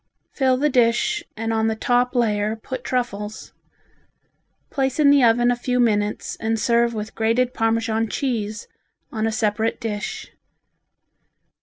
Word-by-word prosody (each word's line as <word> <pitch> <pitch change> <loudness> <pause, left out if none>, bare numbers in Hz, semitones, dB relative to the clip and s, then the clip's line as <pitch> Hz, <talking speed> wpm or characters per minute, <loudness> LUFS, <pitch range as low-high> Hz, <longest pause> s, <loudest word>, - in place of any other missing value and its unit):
Fill 260 -2 +2
the 290 +3 +2
dish 245 +5 +2
and 225 0 -2
on 220 0 +1
the 220 - 0
top 245 +3 +1
layer 215 -2 +1
put 240 +4 -7
truffles. 215 -4 -4 1.2
Place 270 0 -1
in 285 -2 +6
the 285 -2 +5
oven 240 +1 +4
a - - +1
few 250 +1 -1
minutes 210 -3 0
and 225 0 -1
serve 235 +1 +2
with 215 0 -5
grated 235 +3 +1
Parmesan 225 0 0
cheese 220 -5 -3 0.4
on 220 -1 -1
a - - 0
separate 220 +1 0
dish. 210 -3 -5
230 Hz, 140 wpm, -22 LUFS, 220-250 Hz, 1.2 s, in